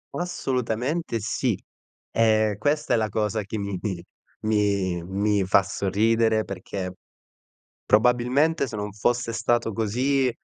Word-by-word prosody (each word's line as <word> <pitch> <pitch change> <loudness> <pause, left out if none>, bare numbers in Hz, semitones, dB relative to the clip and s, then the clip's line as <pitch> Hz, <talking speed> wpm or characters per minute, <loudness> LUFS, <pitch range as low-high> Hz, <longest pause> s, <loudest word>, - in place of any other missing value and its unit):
Assolutamente 130 -4 -2
sì. 115 0 -1 0.5
Ehm, 110 -2 +3
questa 150 +7 0
è - - +4
la 110 -1 0
cosa 105 +1 -1
che 100 +3 -5
mi 100 -2 -3
mi 95 -5 -3 0.4
mi 100 -4 +1
mi 100 +2 +1
fa 95 +1 +4
sorridere, 110 +3 +1
perché 95 -1 -5 0.9
probabilmente, 125 +7 +3
se 110 - -6
non 105 0 -4
fosse 120 +3 0
stato 115 0 0
così, 125 +5 +1
110 Hz, 120 wpm, -25 LUFS, 100-120 Hz, 0.9 s, è